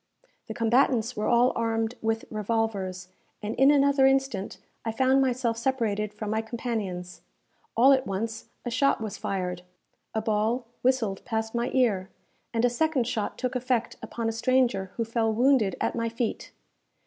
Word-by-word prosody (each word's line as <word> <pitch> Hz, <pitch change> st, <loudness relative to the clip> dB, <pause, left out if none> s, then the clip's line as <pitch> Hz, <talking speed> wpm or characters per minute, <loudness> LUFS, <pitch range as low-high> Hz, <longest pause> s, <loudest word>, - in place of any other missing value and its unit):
The -, -, -6 dB
combatants 235 Hz, 0 st, +2 dB
were 210 Hz, -, -1 dB
all 240 Hz, +1 st, +4 dB
armed 225 Hz, 0 st, 0 dB
with 225 Hz, 0 st, -1 dB
revolvers, 205 Hz, -4 st, -2 dB, 0.3 s
and 210 Hz, +2 st, -2 dB
in 270 Hz, +2 st, +5 dB
another 280 Hz, -1 st, +5 dB
instant 270 Hz, -7 st, 0 dB, 0.3 s
I 225 Hz, -, -1 dB
found 260 Hz, +3 st, +3 dB
myself 245 Hz, -3 st, 0 dB
separated 220 Hz, -5 st, 0 dB
from 210 Hz, 0 st, -5 dB
my 220 Hz, 0 st, +1 dB
companions. 220 Hz, -6 st, -4 dB, 0.6 s
All 265 Hz, +4 st, +7 dB
at 265 Hz, -1 st, +1 dB
once 220 Hz, +3 st, -4 dB, 0.2 s
a 240 Hz, -, -2 dB
shot 275 Hz, +4 st, +2 dB
was 215 Hz, -2 st, -5 dB
fired, 180 Hz, -2 st, -3 dB, 0.5 s
a -, -, +2 dB
ball 220 Hz, +3 st, 0 dB, 0.2 s
whistled 245 Hz, -7 st, +1 dB
past 220 Hz, -2 st, -2 dB
my 235 Hz, +1 st, 0 dB
ear, 210 Hz, -8 st, +2 dB, 0.4 s
and 230 Hz, +1 st, +1 dB
a -, -, +6 dB
second 265 Hz, +1 st, +1 dB
shot 220 Hz, -3 st, -2 dB
took 255 Hz, 0 st, -2 dB
effect 250 Hz, -2 st, 0 dB
upon 230 Hz, -1 st, -4 dB
a -, -, +1 dB
stranger 235 Hz, -4 st, +1 dB
who 230 Hz, -, -1 dB
fell 225 Hz, 0 st, 0 dB
wounded 235 Hz, -4 st, +3 dB
at -, -, 0 dB
my 230 Hz, -1 st, -1 dB
feet. 230 Hz, 0 st, -3 dB
230 Hz, 160 wpm, -27 LUFS, 215-255 Hz, 0.6 s, All